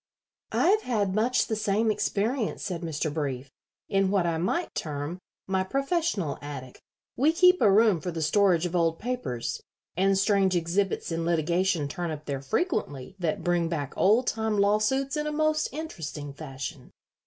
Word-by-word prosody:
"I - - +2
have 425 +2 +4
had 205 - 0
much 230 +5 +2
the 220 - -2
same 215 +1 +1
experience," 215 +3 -1
said 180 -4 -3
Mr. 160 -2 -2
Brief, 135 -4 -3 0.4
"in 195 -1 +2
what 195 -3 +2
I 165 -1 0
might 330 - -1
term 150 +3 -4 0.3
my 190 0 0
professional 275 - -1
attic. 140 -3 -8 0.3
We 290 +5 +3
keep 360 +2 +5
a 210 -4 +6
room 210 -4 +4
for 180 - -3
the 165 -2 -3
storage 180 0 +3
of 175 0 -3
old 165 -1 +2
papers, 205 - -3 0.3
and 195 +2 +3
strange 195 -1 +3
exhibits 175 +2 0
in 165 0 -1
litigation 170 0 +1
turn 170 +4 -4
up 155 -1 -6
there 140 -2 -3
frequently 145 - -2
that 170 -3 -1
bring 175 -1 +1
back 145 -5 -3
old 220 +6 +4
time 220 -2 -1
lawsuits 215 +8 +2
in 300 0 -1
a - - -1
most 310 0 +1
interesting 160 - -6
fashion." 140 -2 -7
190 Hz, 165 wpm, -27 LUFS, 160-220 Hz, 0.4 s, a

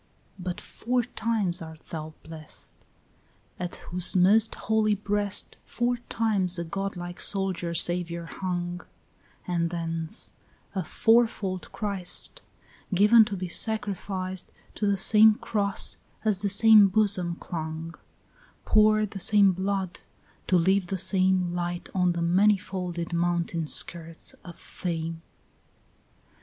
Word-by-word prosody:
2 - - -8
But 180 +2 -4
four 245 +3 -2
times 220 -7 -1
art 160 -1 -10
thou 155 -1 -7
blest, 160 -1 -7 0.9
At 180 -1 -4
whose 180 +1 +1
most 205 +5 +4
holy 220 -1 +1
breast 205 0 -1
Four 245 0 -1
times 195 -5 0
a 170 - -2
godlike 175 0 -5
soldier 185 -4 -2
saviour 170 0 +1
hung; 175 0 -4 0.7
And 170 -2 0
thence 165 +2 -2 0.4
a 190 -2 -2
fourfold 220 -1 +1
Christ 200 - -3 0.5
Given 210 +4 +6
to 200 -2 -4
be 185 0 -4
sacrificed 190 -2 -3 0.2
To 210 - -1
the 200 -1 +2
same 215 +2 +6
cross 205 -3 0 0.3
as 210 -3 +2
the 200 0 -1
same 215 0 +7
bosom 190 -4 +1
clung; 160 -1 -6 0.7
Poured 215 -1 +4
the 195 - -6
same 200 +1 +5
blood, 190 0 -3 0.5
to 185 - +4
leave 190 +2 +2
the 190 - -2
same 185 -1 +2
Light 175 0 -4
on 180 -2 +2
the 170 0 -2
many 195 +5 +4
folded 180 -2 -5
mountain 170 -1 -1
skirts 165 +1 -1
of 175 -2 -10
fame. 165 -2 -5
185 Hz, 125 wpm, -26 LUFS, 175-205 Hz, 0.9 s, same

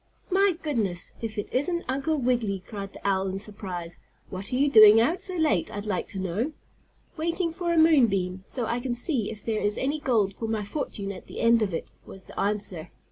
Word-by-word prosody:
"My 385 -2 +3
goodness, 215 - -1
if 225 -1 -5
it 205 - -2
isn't 340 +7 0
Uncle 280 +4 0
Wiggily!" 235 -7 0
cried 200 -1 -6
the - - -6
owl 195 -1 +1
in 190 0 -3
surprise. 185 -4 -6 0.3
"What 190 +1 -4
are - - 0
you 280 +3 +3
doing 215 -4 +9
out 325 +11 +2
so 375 -1 0
late, 305 - +1
I'd 205 0 -5
like 205 -4 -2
to 195 - -6
know?" 195 - -2 0.6
"Waiting 335 +1 -1
for 345 0 -2
a 340 - +1
moon 315 -6 +6
beam, 185 -2 -2
so 245 +4 -3
I 235 +2 -1
can 245 -1 -2
see 245 - 0
if 215 -2 -9
there 220 -2 -1
is 205 0 +1
any 285 +3 -1
gold 220 -9 +1
for 225 - -5
my 220 -2 -2
fortune 200 -5 -4
at 190 - -10
the - - -8
end 230 0 +4
of 205 -3 0
it," 165 - -4 0.2
was 195 - -11
the - - -9
answer. 195 -5 -1
220 Hz, 220 wpm, -26 LUFS, 195-285 Hz, 0.6 s, doing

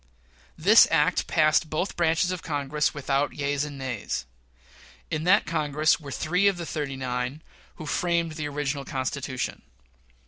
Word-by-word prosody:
This - - +7
act - - +2
passed 155 0 +3
both 165 +6 -2
branches 170 +1 +2
of 180 -2 -4
Congress 150 -1 -1
without 140 0 -1
yeas 145 0 -1
and 145 -1 -6
nays. 125 - -4 0.9
In 155 0 -2
that 195 +4 +5
Congress 155 -1 +1
were 145 -3 -9
three 180 +8 +1
of 195 -2 +2
the 170 - -5
"thirty 145 -4 -3
nine" 125 +3 -3 0.3
who 155 - -8
framed 170 +1 0
the 155 -1 -4
original 145 -1 -2
Constitution. 130 -1 -3
150 Hz, 145 wpm, -26 LUFS, 140-160 Hz, 0.9 s, This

